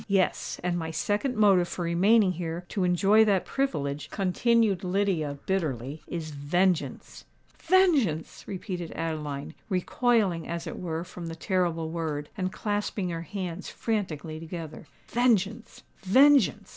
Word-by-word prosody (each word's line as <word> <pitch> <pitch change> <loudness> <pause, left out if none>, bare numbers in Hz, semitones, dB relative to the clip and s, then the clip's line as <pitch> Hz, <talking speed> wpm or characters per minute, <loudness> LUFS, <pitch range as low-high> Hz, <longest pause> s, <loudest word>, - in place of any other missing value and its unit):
"Yes: 195 -3 0
and 175 -1 0
my 160 -1 -4
second 205 - -1
motive 195 -5 +4
for 175 - -4
remaining 190 +4 +4
here 175 0 -4
to 195 - -1
enjoy 195 +5 +5
that 195 -3 +2
privilege," 150 - -2
continued 205 +1 +2
Lydia, 180 -6 0
bitterly, 150 -6 -2
"is 160 -3 -5
vengeance!" 170 +5 -1 0.4
"Vengeance!" 310 - +2
repeated 180 -3 -5
Adeline, 150 -4 -4 0.2
recoiling 195 -2 +1
as 170 0 -4
it 165 - -6
were 165 -2 -3
from 180 -1 -8
the 165 - -5
terrible 165 -3 -1
word, 155 -3 -3
and 185 -1 -2
clasping 205 -2 -2
her 165 -1 -3
hands 185 0 -5
franticly 170 -8 -3
together. 165 -1 -8 0.2
"Vengeance—vengeance!" 240 +3 +2
180 Hz, 125 wpm, -27 LUFS, 165-205 Hz, 0.4 s, enjoy